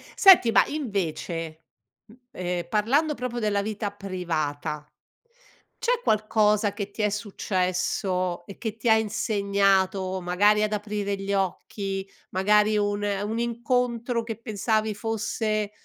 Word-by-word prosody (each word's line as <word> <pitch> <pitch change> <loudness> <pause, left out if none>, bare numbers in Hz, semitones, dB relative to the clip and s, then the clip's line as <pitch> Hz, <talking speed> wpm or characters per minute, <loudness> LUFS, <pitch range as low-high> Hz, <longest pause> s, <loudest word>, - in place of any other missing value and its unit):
senti 380 - +7
ma - - +5
invece, 170 - -3 0.5
m - - -15 0.2
ehm, 180 -1 -3
parlando 260 - +2
proprio 250 -3 -4
della 210 -2 +1
vita 210 0 -3
privata, 160 -7 -3 0.9
c'è 485 0 +1
qualcosa 210 - +2
che 200 -1 -5
ti 215 - -3
è 210 - +3
successo 185 -3 -1
e 200 - -10
che 220 -3 -4
ti 230 +1 0
ha 220 - +7
insegnato 200 -3 +1
magari 205 +4 +3
ad 215 0 0
aprire 205 -1 -2
gli 195 0 -4
occhi, 195 +1 -2 0.3
magari 210 +3 +3
un 205 0 0
un 205 +2 -1
incontro 235 0 0
che 225 -1 -5
pensavi 220 -1 0
fosse, 215 -1 -2
205 Hz, 125 wpm, -26 LUFS, 190-220 Hz, 0.9 s, senti